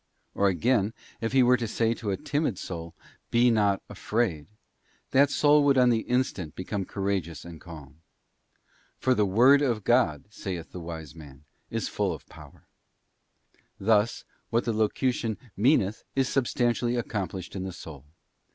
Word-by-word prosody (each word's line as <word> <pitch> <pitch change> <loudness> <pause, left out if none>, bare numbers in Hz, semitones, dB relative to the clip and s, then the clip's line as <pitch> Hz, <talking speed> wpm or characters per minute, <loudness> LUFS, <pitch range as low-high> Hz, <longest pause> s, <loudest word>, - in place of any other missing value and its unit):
Or, 100 - +2
again, 105 +4 +1 0.3
if 115 - -1
He 130 0 +5
were 125 +1 +5
to 120 -2 -3
say 115 +1 +1
toa 105 -5 -3
timid 145 - -1
soul, 85 -3 -7 0.3
Be 120 +1 +4
not 105 -3 +2
afraid; 100 -10 -2 0.6
that 140 +1 +5
soul 145 0 +4
would 140 -1 +4
on 125 -1 +5
the 115 - +2
instant 110 - -1
become 95 +1 -3
courageous 95 -7 -3
and 85 -2 -10
calm. 80 -3 -12 1.0
For 130 - +2
'The 105 -4 +2
Word 125 +9 +6
of 120 -7 0
God,' 90 - +2
saith 90 -6 -6
the 90 - -7
wise 80 -4 -7
man, 75 -4 -13 0.3
'is 115 -1 -2
full 100 -4 -1
of 80 - -10
power..* - - -15 1.1
Thus, 105 +2 +2 0.2
what 115 +1 +1
the 115 - 0
locution 110 +1 0 0.2
meaneth 110 -3 +2
is 135 -1 +2
substantially 120 -2 0
accomplished 100 -6 -4
in 95 - -3
the 95 - -4
soul. 75 -5 -10
105 Hz, 150 wpm, -27 LUFS, 90-120 Hz, 1.1 s, Word